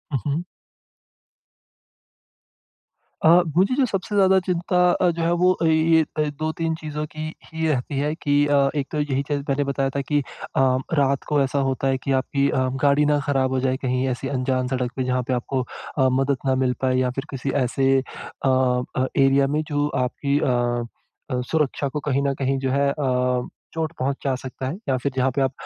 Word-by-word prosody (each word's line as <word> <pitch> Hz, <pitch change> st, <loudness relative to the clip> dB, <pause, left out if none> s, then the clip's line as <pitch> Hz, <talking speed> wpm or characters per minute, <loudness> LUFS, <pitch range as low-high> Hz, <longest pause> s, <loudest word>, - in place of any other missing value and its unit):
हुँ, -, -, +1 dB
हुँ। 165 Hz, +5 st, -1 dB, 2.8 s
अ, 160 Hz, -, +6 dB, 0.3 s
मुझे 195 Hz, +7 st, +3 dB
जो 270 Hz, -1 st, +3 dB
सबसे 205 Hz, -1 st, -3 dB
ज़्यादा 190 Hz, -1 st, +5 dB
चिंता 180 Hz, 0 st, +2 dB, 0.2 s
जो -, -, -1 dB
है 170 Hz, -, +2 dB
वो 185 Hz, 0 st, +4 dB
ये 160 Hz, 0 st, +4 dB, 0.3 s
2-3 160 Hz, +1 st, -1 dB
चीज़ों 150 Hz, -1 st, -5 dB
की 155 Hz, +1 st, -6 dB, 0.2 s
ही 160 Hz, 0 st, -3 dB
रहती 135 Hz, -1 st, -1 dB
है 150 Hz, +2 st, 0 dB
कि 145 Hz, -2 st, +2 dB
अ, 140 Hz, -1 st, +3 dB
एक 140 Hz, -2 st, -1 dB
तो 150 Hz, -, -2 dB
यही 140 Hz, -2 st, 0 dB
चीज़ 145 Hz, 0 st, -2 dB
मैंने 140 Hz, +1 st, +1 dB
बताया 140 Hz, -1 st, -1 dB
था 140 Hz, -, +1 dB
कि 145 Hz, +2 st, 0 dB, 0.4 s
अ, -, -, +3 dB, 0.3 s
रात 140 Hz, -2 st, +2 dB
को 150 Hz, -2 st, +2 dB
ऐसा 135 Hz, +1 st, 0 dB
होता 135 Hz, +1 st, -1 dB
है 135 Hz, -1 st, +2 dB
कि 140 Hz, -, -1 dB
आपकी 140 Hz, 0 st, 0 dB
अ, 130 Hz, 0 st, +1 dB
गाड़ी 145 Hz, +1 st, +4 dB
ना 150 Hz, 0 st, +2 dB
ख़राब 135 Hz, -2 st, +1 dB
हो 130 Hz, -, +1 dB
जाए। 130 Hz, 0 st, 0 dB
कहीं 130 Hz, 0 st, 0 dB
ऐसी 125 Hz, +1 st, -3 dB
अनजान 130 Hz, -1 st, -1 dB
सड़क 125 Hz, -1 st, -2 dB
पे 130 Hz, -, -1 dB
जहाँ 125 Hz, 0 st, 0 dB
पे 130 Hz, -, 0 dB
आपको 125 Hz, +2 st, -1 dB, 0.4 s
अ, 130 Hz, -, +4 dB
मदद 135 Hz, +1 st, +1 dB
ना 130 Hz, -1 st, +2 dB
मिल 125 Hz, -, +1 dB
पाए 130 Hz, -1 st, +2 dB
या 130 Hz, -1 st, +2 dB
फिर 135 Hz, -, -3 dB
किसी 135 Hz, 0 st, -4 dB
ऐसे 135 Hz, +2 st, +1 dB, 0.5 s
अ, 130 Hz, -1 st, +2 dB, 0.3 s
एरिया 135 Hz, 0 st, +4 dB
में 150 Hz, +2 st, 0 dB
जो 145 Hz, -1 st, 0 dB, 0.2 s
आपकी 140 Hz, +3 st, -1 dB
अ 120 Hz, -3 st, 0 dB, 0.5 s
अ, 125 Hz, 0 st, 0 dB
सुरक्षा 150 Hz, -3 st, 0 dB
को 150 Hz, +2 st, -3 dB
कहीं 140 Hz, 0 st, +1 dB
न 140 Hz, -, +1 dB
कहीं 135 Hz, 0 st, 0 dB
जो 130 Hz, -1 st, -1 dB
है 140 Hz, +1 st, +2 dB
अ, 125 Hz, -3 st, 0 dB, 0.3 s
चोट 160 Hz, -1 st, -2 dB
पहुँचा 135 Hz, +1 st, -1 dB
सकता 130 Hz, 0 st, -6 dB
है 140 Hz, -, -3 dB
या 130 Hz, -, +3 dB
फिर 140 Hz, -, 0 dB
जहाँ 130 Hz, 0 st, +2 dB
पे 140 Hz, -, +1 dB
आप 135 Hz, -, +2 dB
140 Hz, 195 wpm, -23 LUFS, 130-150 Hz, 2.8 s, अ